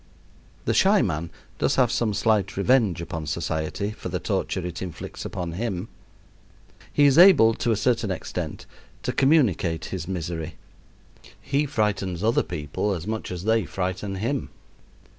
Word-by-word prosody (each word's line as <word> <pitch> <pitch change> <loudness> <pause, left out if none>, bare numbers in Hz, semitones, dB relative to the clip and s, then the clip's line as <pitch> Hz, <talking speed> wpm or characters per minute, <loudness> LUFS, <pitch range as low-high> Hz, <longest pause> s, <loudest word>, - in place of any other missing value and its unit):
The - - +1
shy - - +4
man 80 +2 -2 0.3
does - - +2
have 125 -3 +3
some 110 -4 0
slight 105 -4 +1
revenge 100 -6 +2
upon 80 -2 -5
society 80 +5 -2
for 110 - -7
the - - -2
torture 90 - -2
it 90 -1 -5
inflicts 90 -3 -7
upon 90 -3 -4
him. 100 +1 -3 1.0
He 145 - +4
is 140 +2 +5
able, 175 -12 +8
to 120 - -2
a - - +3
certain 110 0 +1
extent, 95 - -4 0.4
to - - -1
communicate 110 - +2
his 85 -3 -4
misery. 85 -3 -4 0.8
He 140 +2 0
frightens 100 - -1
other 115 +2 +3
people 75 +7 -3
as 85 -1 -6
much 110 -2 -4
as 90 -1 -5
they 110 -1 +2
frighten 95 +2 -3
him. 120 +8 -2
100 Hz, 150 wpm, -25 LUFS, 85-115 Hz, 1.0 s, able